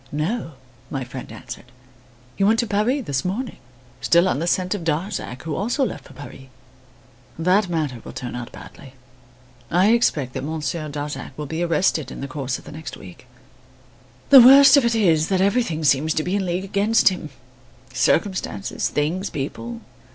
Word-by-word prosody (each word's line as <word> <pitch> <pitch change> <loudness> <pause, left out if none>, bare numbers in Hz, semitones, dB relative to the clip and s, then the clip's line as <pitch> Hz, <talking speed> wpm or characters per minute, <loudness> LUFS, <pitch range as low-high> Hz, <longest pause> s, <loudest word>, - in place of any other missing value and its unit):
"No," 160 +4 -3 0.4
my 135 -2 -3
friend 125 +1 -9
answered. - - -9 0.7
"He - - -1
went 220 +3 +4
to 235 - +1
Paris 230 +6 0
this 135 -2 -1
morning, 220 +8 -3 0.4
still 170 +2 +4
on 160 - 0
the 170 - -2
scent 180 +1 +1
of 200 -5 -5
Darzac, 160 - -3
who 160 -1 -4
also 245 +6 0
left - - -6
for - - -14
Paris. 135 0 -11 0.9
That 185 +4 +2
matter 150 -8 -2
will - - -9
turn 125 -2 -6
out 120 -1 -6
badly. 135 -1 -13 0.7
I 185 +5 +4
expect 150 - +1
that 130 - -4
Monsieur 155 +1 -3
Darzac 145 0 -6
will 150 - -4
be 160 +4 -4
arrested 170 -5 +1
in - - -8
the 140 - -5
course 130 -2 -3
of - - -15
the - - -10
next 155 +1 -8
week. 90 -3 -13 1.0
The 270 -2 +11
worst 275 +3 +9
of 280 - +4
it 235 -1 +1
is 165 -8 +3
that 190 -1 +1
everything 195 -5 +1
seems 150 +2 +2
to 155 - 0
be 180 +4 -1
in 195 -2 -1
league 180 +2 -2
against 205 +4 +3
him, 180 -5 -6 0.6
circumstances, 185 +9 0
things, 165 +7 -1
people. 230 - -5
170 Hz, 175 wpm, -22 LUFS, 145-205 Hz, 1.0 s, The